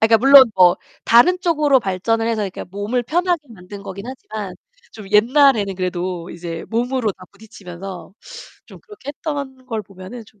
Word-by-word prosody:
아 220 - +5
그러니까 225 -1 +5
물론 270 0 +8
뭐 180 -2 +5 0.3
다른 245 +11 +5
쪽으로 300 -6 +3
발전을 225 +4 -1
해서 225 -2 -1
이렇게 190 -2 -5
몸을 205 +7 -3
편하게 345 +4 0
만든 200 -1 -11
거기 195 0 -8
ㄴ하지만 215 -6 -7 0.4
좀 210 -3 -11
옛날에는 225 -2 +4
그래도 180 -1 -4
이제 170 -1 -7
몸으로 235 -1 -1
다 185 0 -15
부딪히면서 195 -3 -10 0.5
좀 - - -14
그렇게 420 - -14
했던 280 -4 -6
걸 225 -4 -4
보면은 195 +5 -11
좀 210 -2 -24
220 Hz, 370 characters per minute, -19 LUFS, 190-260 Hz, 0.5 s, 물론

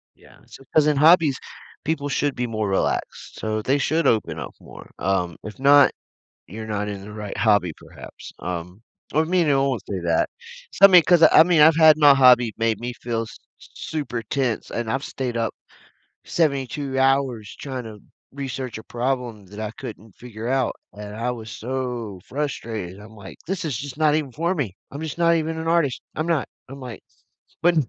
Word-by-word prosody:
Yeah, - - -20
so 135 - -14
'cause 150 -1 +4
in 150 - +2
hobbies, 155 -2 +5 0.5
people 145 -2 -2
should 145 +1 0
be 125 0 -2
more 110 -2 -2
relaxed, 95 - -2
so 110 0 -2
they 135 +6 +1
should 155 +1 +1
open 110 -2 +1
up - - -6
more, - - -13
um, 90 -3 0
if 110 +3 -9
not, 140 0 +6 0.6
you're 110 +6 -8
not 105 -1 -3
in 100 -1 -5
the 105 +1 -10
right 105 -1 -6
hobby 105 -6 +2
perhaps, - - -12
um, 90 +3 -6 0.3
or 155 +2 +3
may 180 0 +2
know 140 -2 +2
won't 125 -7 -2
say 95 - -3
that. 85 -1 +1 0.4
So, 195 - +3
I - - +3
mean, 180 -3 +8
'cause, 170 +2 +4
I 160 0 +8
mean, 165 -2 +3
I've 160 +1 +7
had 155 -2 +7
my 145 -2 +7
hobby 125 -4 +5
made 115 -2 0
me 120 +1 -4
feel 115 -1 -3
s 115 - -10 0.2
s - - -15
super 125 -7 -4
tense, 120 0 -2
and 115 -2 -3
I've 135 +3 -1
stayed 125 -3 -4
up 115 -1 -1 0.7
72 140 -3 -1
hours 130 -6 +1
trying 130 -3 -5
to 110 -2 -9 0.3
research 130 -3 -5
a 110 - -9
problem 120 -4 -3
that 105 +3 -12
I 110 -1 -3
couldn't 105 -1 -10
figure 115 -2 -9
out, 130 -2 0 0.2
and 105 +1 -9
I 120 +2 -1
was 110 -2 -8
so 120 -5 -4
frustrated, 115 -9 -4
I'm 110 +1 -14
like, 95 -2 -11
"This 190 0 -3
is 145 -7 -2
just 140 +1 -7
not 155 -1 +3
even 150 -3 -1
for 170 +8 -1
me. 115 - -3
I'm 140 - -7
just 160 +1 -5
not 170 0 +4
even 160 0 -1
an 160 - -5
artist. 165 -6 +1
I'm 155 +2 -2
not." 165 -5 0 0.2
I'm 135 +1 -10
like 125 -3 -8 0.6
but, 175 +1 +4
130 Hz, 195 wpm, -23 LUFS, 110-150 Hz, 0.7 s, mean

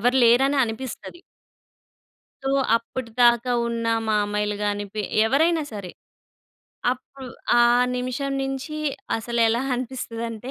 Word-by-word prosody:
ఎవరు 245 +4 +2
లేరనే 265 +5 +4
అనిపిస్తది. 250 +8 -7 1.2
సో, 270 - -1 0.3
అప్పటిదాకా 240 +1 +1 0.2
ఉన్న 230 0 -2 0.2
మామయ్యలు 210 -1 0
గానీ, 205 0 -1
పి 215 - -2 0.2
ఎవరైనా 315 +7 +3
సరే, 195 -4 -6 1.0
అప్పు 265 +2 -12 0.4
ఆ - - +6 0.4
నిమిషం 255 +2 -2
నించీ 270 +3 -4 0.4
అసలెలా 230 +1 +1
అనిపిస్తదంటే, 235 -1 -5
240 Hz, 95 wpm, -24 LUFS, 225-265 Hz, 1.2 s, ఆ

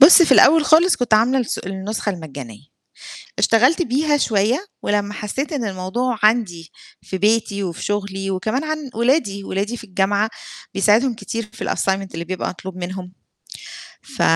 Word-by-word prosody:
بُص، 330 +5 +9
في 330 - +4
الأول 315 0 +6
خالص 335 +4 +5
كنت 240 -3 +2
عاملة 245 +5 +3
الس 235 - -3
النسخة 195 +3 -4
المجانية. 140 - -9 0.7
اشتغلت 255 +10 +4
بيها 295 +2 +1
شوية 235 - +1 0.2
ولمّا 205 0 -1
حسّيت 265 +10 -4
إن 250 -6 -2
الموضوع 210 +6 -2
عندي 205 -8 +1 0.3
في 190 - -5
بيتي 205 0 +1
وفي 170 -3 -5
شُغلي 195 -1 -3
وكمان 215 +9 -2
عن 310 -2 -4
ولادي، 235 -4 +1
ولادي 205 +6 -3
في 230 - -11
الجامعة 200 +2 0 0.4
بيساعدهم 220 +6 +3
كتير 225 -1 -5
في - - -5
الassignment 195 0 0
اللي 165 +1 -5
بيبقى 185 +1 -3
مطلوب 185 +1 -8
منهم. 180 0 -6 0.9
ف 270 -2 -8
210 Hz, 150 wpm, -20 LUFS, 190-250 Hz, 0.9 s, بُص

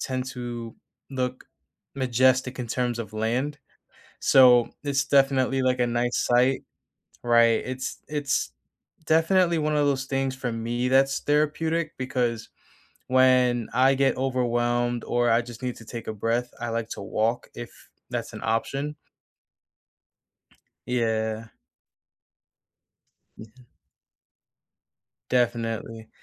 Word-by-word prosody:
tend 130 -1 -2
to 120 -2 -6 0.4
look 130 -1 -3 0.5
majestic 130 0 +2
in 125 - -4
terms 120 0 -1
of 110 -2 -6
land? 125 +7 -1 0.6
So, 125 -3 +6
it's 140 -1 +1
definitely, 135 -1 +2
like, 130 -1 +1
a 120 - +3
nice 120 +1 0
sight. 125 +2 +3 0.6
Right. 115 -1 +4
It's 130 +1 -4
it's 145 -2 -1 0.5
definitely 170 +2 +3
one 150 0 0
of 145 -1 +2
those 135 -1 0
things 135 -1 -1
for 125 -2 -3
me 120 +2 -2
that's 135 +1 +3
therapeutic 155 +2 0
because 125 -3 -2 0.6
when 125 -2 +3
I 130 +2 +4
get 135 -1 +2
overwhelmed 120 -2 0
or 120 0 +1
I 115 +1 +4
just 120 -1 -11
need 125 -1 -2
to 115 - -13
take 115 +1 -8
a 110 - -3
breath, 115 +3 -1
I 120 - -2
like 115 0 -3
to - - -5
walk 115 +4 -1
if 120 -1 -7 0.4
that's - - -4
an - - -8
option. 135 +6 -2 1.9
Yeah. 110 -2 -1 1.9
Yeah. 110 0 -12 1.8
Definitely. 115 -2 -1
125 Hz, 115 wpm, -25 LUFS, 115-135 Hz, 1.9 s, So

